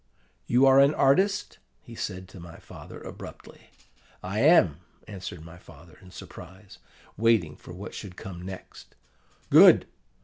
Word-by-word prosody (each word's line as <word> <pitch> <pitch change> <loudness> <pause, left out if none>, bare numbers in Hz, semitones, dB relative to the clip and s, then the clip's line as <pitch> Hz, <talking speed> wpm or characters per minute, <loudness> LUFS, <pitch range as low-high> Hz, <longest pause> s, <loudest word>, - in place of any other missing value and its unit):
"'You 125 +3 +3
are 135 0 +6
an 140 +2 +4
artist?' 195 +9 +1 0.2
he 115 - -13
said 95 -4 -6
to 95 - -13
my 85 -1 -12
father - - -12
abruptly. - - -12 0.5
"'I 95 +4 -4
am,' 125 - +4 0.3
answered 95 -5 -9
my 85 +1 -13
father 80 0 -17
in 95 - -16
surprise, 95 +2 -13 0.4
waiting 110 -9 +1
for - - -14
what 95 +4 -9
should 95 -4 -9
come 90 -2 -9
next. 95 +1 -11 0.6
"'Good! - - +7
95 Hz, 140 wpm, -26 LUFS, 90-120 Hz, 0.6 s, Good